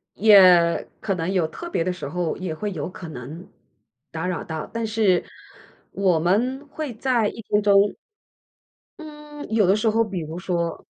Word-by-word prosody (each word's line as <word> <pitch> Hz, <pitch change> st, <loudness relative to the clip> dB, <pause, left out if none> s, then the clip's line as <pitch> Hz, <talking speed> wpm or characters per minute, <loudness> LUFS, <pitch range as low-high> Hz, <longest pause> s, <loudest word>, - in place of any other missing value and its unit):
也 185 Hz, -5 st, +6 dB
可 195 Hz, -, -2 dB
能 170 Hz, +1 st, -2 dB
有 180 Hz, -4 st, +1 dB
特 345 Hz, -, -8 dB
别 170 Hz, -, -1 dB
的 185 Hz, -, -1 dB
时 180 Hz, -, -7 dB
候 170 Hz, +1 st, -2 dB
也 185 Hz, -3 st, -4 dB
会 205 Hz, +6 st, -4 dB
有 160 Hz, -3 st, -4 dB
可 180 Hz, -2 st, -9 dB
能 155 Hz, +6 st, -9 dB, 0.6 s
打 160 Hz, +2 st, -4 dB
扰 180 Hz, -2 st, -3 dB
到， 160 Hz, -2 st, -5 dB
但 230 Hz, 0 st, -2 dB
是 215 Hz, -5 st, +2 dB, 0.7 s
我 185 Hz, -4 st, +1 dB
们 245 Hz, -, 0 dB
会 295 Hz, -2 st, -6 dB
在 235 Hz, -2 st, +1 dB
1 230 Hz, -, -6 dB
分 210 Hz, -, +2 dB
钟 200 Hz, 0 st, +4 dB, 1.0 s
嗯， 300 Hz, -1 st, -10 dB
有 220 Hz, -2 st, +3 dB
的 190 Hz, +3 st, +3 dB
时 220 Hz, +1 st, +1 dB
候 225 Hz, +1 st, +2 dB
比 195 Hz, -5 st, -5 dB
如 160 Hz, +2 st, -7 dB
说 170 Hz, -2 st, -3 dB
195 Hz, 180 characters per minute, -23 LUFS, 170-225 Hz, 1.0 s, 也